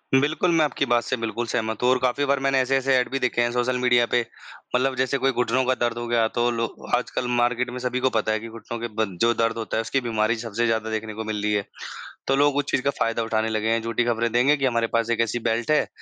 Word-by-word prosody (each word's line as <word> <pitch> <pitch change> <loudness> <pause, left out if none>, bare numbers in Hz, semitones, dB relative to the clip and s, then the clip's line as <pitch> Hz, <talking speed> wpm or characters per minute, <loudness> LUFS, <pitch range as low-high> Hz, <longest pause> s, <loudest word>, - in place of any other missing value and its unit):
बिल्कुल, 150 +6 +2
मैं 165 -2 +4
आपकी 145 -1 -1
बात 120 0 +3
से - - -1
बिल्कुल 115 +1 -3
सहमत 110 -1 -2
हूँ 125 - +4
और 130 - +4
काफ़ी 130 +3 +1
बार 140 0 +1
मैंने 135 -1 +3
ऐसे-ऐसे 135 +1 +2
ऐड 125 - +1
भी 135 - -1
देखे 125 -2 +1
हैं 120 0 +1
सोशल 125 +1 0
मीडिया 125 -1 +4
पे, 120 - +3 0.5
मतलब 130 +1 +1
जैसे 130 +1 0
कोई 135 0 +1
घुटनों 125 +1 +1
का 130 - +2
दर्द 120 -1 0
हो 120 0 -4
गया 115 -1 +2
तो 120 0 +3
लो 115 0 -1 0.3
आजकल 125 0 -3
मार्केट 125 +1 +1
में 125 - -6
सभी 125 0 -2
को 130 0 +2
पता 110 0 0
है 110 - 0
कि 115 - -8
घुटनों 115 +1 -7
के 120 - -3
ब 110 - +3 0.2
जो 120 0 +4
दर्द 115 0 0
होता 110 -1 -3
है, - - +2
उसकी 115 +5 -1
बीमारी 115 -1 0
सबसे 115 0 -2
ज़्यादा 110 -1 0
देखने 110 0 -4
को 110 +1 -5
मिल 110 -1 -3
रही 105 0 +1
है। 105 -1 0 0.6
तो 135 - +3
लोग 145 0 +3
उस 145 - +1
चीज़ - - +1
का 140 - +2
फ़ायदा 115 0 0
उठाने 110 0 0
लगे 110 0 -1
हैं। 115 0 +1
झूठी 115 +1 0
ख़बरें 115 -1 0
देंगे 135 +6 +3
कि 135 - 0
हमारे 115 -2 +1
पास 115 0 +1
एक 115 - +1
ऐसी 115 +1 -1
बेल्ट 115 +5 -1
है 150 - +3
120 Hz, 275 wpm, -24 LUFS, 115-130 Hz, 0.6 s, मैं